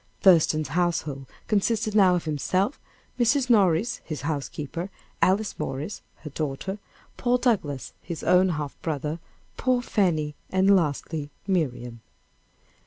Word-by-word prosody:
Thurston's 155 -5 +5
household 155 -4 -1 0.2
consisted 215 +1 +1
now 190 -4 +5
of 175 - -2
himself, 185 - 0 0.4
Mrs. 250 +1 +3
Morris, 200 +1 +3
his 155 -4 -5
housekeeper; 150 +4 -4 0.3
Alice 195 +2 +2
Morris, 140 +9 -4 0.2
her 150 - -7
daughter; 155 +7 -3 0.4
Paul 245 0 +2
Douglass, 150 - 0
his 170 -2 -6
own 180 +2 +5
half 150 -4 -3
brother; 150 0 -2 0.4
poor 250 -1 +1
Fanny, 160 -10 +1 0.2
and 190 +1 +4
lastly, 150 -2 -1 0.2
Miriam. 125 - -1
170 Hz, 115 wpm, -26 LUFS, 150-200 Hz, 0.4 s, Thurston's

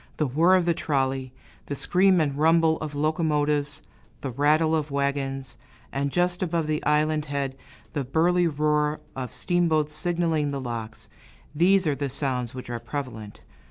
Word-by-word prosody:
The 155 - +1
whirr 165 +8 +4
of 180 -2 +2
the 170 - +3
trolley, 135 -4 -1 0.4
the 140 - -3
scream 185 +5 +3
and 145 -3 0
rumble 160 +1 +3
of 150 -2 -5
locomotives, 150 -1 0 0.4
the 135 - -4
rattle 155 +5 +3
of 155 -1 -1
wagons; 140 -2 -2 0.3
and 140 +1 -1
just 175 +2 0
above 170 -3 0
the 155 0 -2
island 150 0 +2
head, 140 -2 -3 0.4
the 145 -4 -1
burly 170 +6 +2
roar 150 0 +1 0.2
of 130 -2 -5
steamboats 160 -4 +1
signaling 165 -2 0
the 140 -1 -3
locks, 115 -3 -6 0.5
these 185 +4 +4
are 150 - +2
the 140 0 -3
sounds 130 -2 -2
which 130 - -7
are 120 -1 -4
prevalent. 115 -3 -6
150 Hz, 160 wpm, -25 LUFS, 135-160 Hz, 0.5 s, whirr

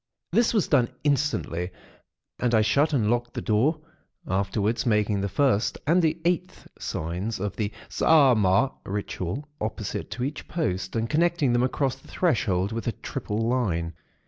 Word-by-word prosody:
"This 235 - +3
was 210 -7 +1
done, 125 -5 +3
instantly; 140 - 0 0.7
and 120 -2 +2
I 110 - +5
shut 140 +9 +3
and 115 -7 +2
locked 120 0 -1
the - - -1
door, 130 +9 +2 0.5
afterwards 100 +4 0
making 105 -3 +1
the 100 - -1
First 125 -3 +1
and 170 +5 +4
the 160 0 +1
Eighth 180 +1 -1
signs 90 +7 -3
of 100 -1 -3
the 105 +1 -2 0.2
Saaamaaa 130 -6 +4
Ritual 100 - -4
opposite 110 0 -3
to 125 - -4
each 145 +3 -4
post, 95 - -2
and 115 0 0
connecting 155 -1 +2
them 120 - +3
across 130 +1 0
the - - -19
threshold 105 - +1
with 115 +1 -4
a 115 - 0
triple 110 +3 -3
line. 90 -10 0
115 Hz, 155 wpm, -26 LUFS, 100-145 Hz, 0.7 s, I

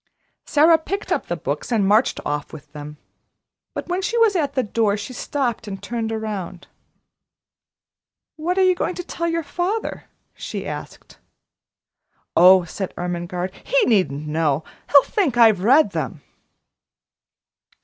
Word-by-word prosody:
Sara 320 +2 +5
picked 395 +5 -5
up - - 0
the - - -2
books - - -4
and 210 -4 +2
marched 215 +5 +3
off 150 0 -3
with 150 -1 -12
them. 150 0 -9 0.8
But - - -5
when 360 +1 -1
she 445 +5 -1
was 450 -4 +4
at 305 -5 0
the 260 - +2
door, 210 -1 +1
she 210 +5 -7
stopped 245 -4 -2
and 195 -1 -5
turned 225 +3 -4
around. 210 -5 -5 1.7
"What 345 +4 -2
are 380 - +4
you 370 0 +5
going 360 0 -2
to 355 - -5
tell 335 -1 -3
your 335 0 -1
father?" 365 +8 -3 0.3
she - - -6
asked. - - -8 1.2
"Oh," 185 +1 +7
said 185 +3 -6
Ermengarde, 175 +1 -3
"he - - +2
needn't 155 - +1
know; 155 -1 0 0.3
he'll 280 -1 +8
think 355 - 0
I've 220 -5 +6
read 270 +10 +5
them." - - -4
225 Hz, 145 wpm, -21 LUFS, -, 1.7 s, he'll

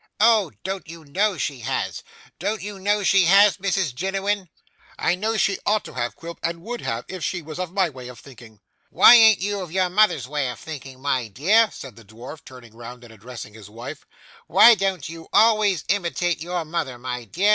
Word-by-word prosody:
'Oh! 215 -6 +4
Don't 190 -1 -5
you 165 -1 -11
know 195 +7 0
she 140 -1 -3
has? 115 - -3 0.4
Don't 200 +2 -3
you 205 -1 -7
know 205 +2 0
she 195 -1 +4
has, 195 +3 +5
Mrs 190 -6 -1
Jiniwin? 195 +4 -2 0.5
'I - - +1
know 215 +5 -2
she 195 -1 +1
ought 210 0 0
to - - -10
have, 120 -1 -3
Quilp, 170 0 -10
and 170 0 -4
would 240 +2 -6
have, 115 +1 -4
if 185 -3 -7
she 175 -3 -3
was 155 +3 -8
of 180 -2 -4
my 190 -1 +1
way 130 -5 -10
of 125 -1 -11
thinking.' 115 -6 -15 0.3
'Why - - +7
an't 220 -4 +7
you 200 0 -2
of 180 -4 -8
your 185 0 0
mother's 210 -8 +2
way 145 -2 -2
of 125 - -7
thinking, 135 -4 -9
my 130 -4 -1
dear?' 195 - +3
said 130 - -11
the 115 - -14
dwarf, 120 +8 -11
turing 125 -4 -14
round 120 +1 -11
and 115 -1 -14
addressing 110 0 -10
his 105 -2 -13
wife, 120 +7 -9 0.4
'why 235 - +7
don't 190 -7 -2
you 165 +1 -10
always 215 -6 +3
imitate 175 -3 -1
your 175 0 -3
mother, 155 -6 -4
my 125 -1 -6
dear? 185 - 0
170 Hz, 205 wpm, -22 LUFS, 130-195 Hz, 0.5 s, Why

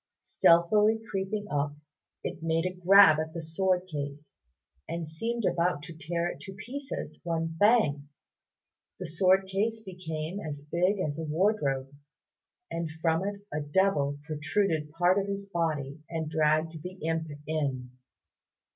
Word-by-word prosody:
Stealthily 210 +6 +4
creeping 200 +2 -2
up 145 0 0 0.5
it - - -5
made 165 +1 +1
a 185 - -1
grab 185 -3 +7
at 160 +1 -4
the 165 - -4
sword 180 +3 +1
case, 145 -3 -6 0.6
and 170 -1 -3
seemed 225 +8 -2
about 170 -4 +1
to 165 - -8
tear 170 +2 -2
it - - -6
in 195 - -8
pieces, 260 +8 -6
when 165 -1 -2
bang! 150 -11 +3 0.9
the 185 - -4
sword 185 +4 +3
case 210 +4 -1
became 180 -3 -5
as 145 -5 -6
big 180 +6 +1
as 155 -5 -2
a - - -3
wardrobe, 150 -5 0 0.8
and 165 -1 -2
from 165 +1 +2
it 200 0 -4
a 150 - 0
devil 145 -2 +1
protruded 155 +1 0
part 175 +4 +3
of 195 - -2
his 200 0 -3
body 155 -6 -2
and 160 -2 -3
dragged 155 +1 +1
the 180 +3 -6
imp 160 0 0 0.2
in. 135 -5 -2
165 Hz, 145 wpm, -29 LUFS, 155-190 Hz, 0.9 s, grab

